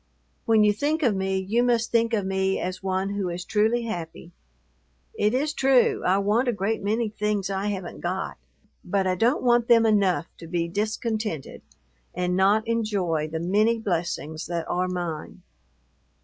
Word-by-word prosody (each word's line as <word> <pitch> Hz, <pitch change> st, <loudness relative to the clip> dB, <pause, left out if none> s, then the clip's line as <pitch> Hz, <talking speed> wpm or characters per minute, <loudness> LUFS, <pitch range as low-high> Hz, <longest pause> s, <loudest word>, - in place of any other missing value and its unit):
When 220 Hz, -2 st, +5 dB
you 210 Hz, 0 st, +4 dB
think 300 Hz, +8 st, -1 dB
of 230 Hz, -6 st, +3 dB
me, 190 Hz, 0 st, -1 dB
you 200 Hz, +5 st, 0 dB
must 235 Hz, -1 st, +1 dB
think 230 Hz, 0 st, +2 dB
of 205 Hz, -3 st, -1 dB
me 190 Hz, 0 st, 0 dB
as 185 Hz, +1 st, -4 dB
one 190 Hz, +1 st, -1 dB
who 200 Hz, -3 st, -2 dB
is 175 Hz, +1 st, -5 dB
truly 225 Hz, +3 st, +1 dB
happy. 170 Hz, -5 st, -6 dB, 0.8 s
It 210 Hz, +3 st, +1 dB
is 295 Hz, +3 st, 0 dB
true, 265 Hz, -3 st, +3 dB
I 185 Hz, +2 st, +3 dB
want 210 Hz, +6 st, +1 dB
a -, -, +3 dB
great 205 Hz, +2 st, -1 dB
many 220 Hz, +3 st, 0 dB
things 210 Hz, -2 st, -2 dB
I 195 Hz, +1 st, -2 dB
haven't 195 Hz, -4 st, -4 dB
got, 185 Hz, +2 st, -3 dB, 0.5 s
but 195 Hz, -1 st, 0 dB
I 185 Hz, -, +2 dB
don't 235 Hz, -, +1 dB
want 240 Hz, -1 st, +3 dB
them 230 Hz, -1 st, +5 dB
enough 200 Hz, -6 st, +2 dB
to 165 Hz, -, -9 dB
be 170 Hz, 0 st, -1 dB
discontented 215 Hz, -, -3 dB, 0.5 s
and 180 Hz, 0 st, 0 dB
not 205 Hz, +4 st, +3 dB
enjoy 200 Hz, -9 st, 0 dB
the 160 Hz, +1 st, -4 dB
many 210 Hz, +7 st, +2 dB
blessings 170 Hz, -7 st, -3 dB
that 170 Hz, -1 st, -3 dB
are 180 Hz, +1 st, 0 dB
mine. 175 Hz, -4 st, -5 dB
200 Hz, 170 wpm, -25 LUFS, 180-225 Hz, 0.8 s, When